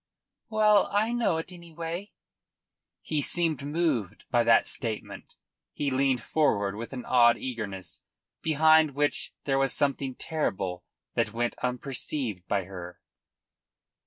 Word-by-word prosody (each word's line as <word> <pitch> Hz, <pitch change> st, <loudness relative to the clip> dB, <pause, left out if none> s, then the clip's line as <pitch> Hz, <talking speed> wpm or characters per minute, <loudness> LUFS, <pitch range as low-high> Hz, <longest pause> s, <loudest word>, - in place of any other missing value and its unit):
"Well... 215 Hz, -2 st, +4 dB
I 215 Hz, +3 st, +2 dB
know 230 Hz, -9 st, +1 dB
it, 160 Hz, +3 st, -5 dB
anyway." 170 Hz, +2 st, -6 dB, 0.9 s
He 155 Hz, -2 st, -1 dB
seemed 160 Hz, -2 st, +1 dB
moved 145 Hz, -, -1 dB
by 120 Hz, -1 st, +4 dB
that 115 Hz, 0 st, +5 dB
statement. 115 Hz, -5 st, -5 dB, 0.4 s
He 145 Hz, -2 st, -1 dB
leaned 130 Hz, -2 st, +1 dB
forward 100 Hz, -11 st, +1 dB
with 115 Hz, +2 st, -6 dB
an 130 Hz, -2 st, -6 dB
odd 120 Hz, -2 st, +5 dB
eagerness, 100 Hz, -8 st, -6 dB, 0.4 s
behind 155 Hz, -1 st, +4 dB
which 145 Hz, 0 st, 0 dB
there 135 Hz, -1 st, +1 dB
was 135 Hz, -1 st, +2 dB
something 135 Hz, -2 st, 0 dB
terrible 95 Hz, -, -2 dB, 0.3 s
that 110 Hz, -, 0 dB
went 120 Hz, +1 st, -1 dB
unperceived 125 Hz, -5 st, -3 dB
by 100 Hz, -2 st, 0 dB
her. 90 Hz, -1 st, -9 dB
135 Hz, 125 wpm, -28 LUFS, 115-160 Hz, 0.9 s, that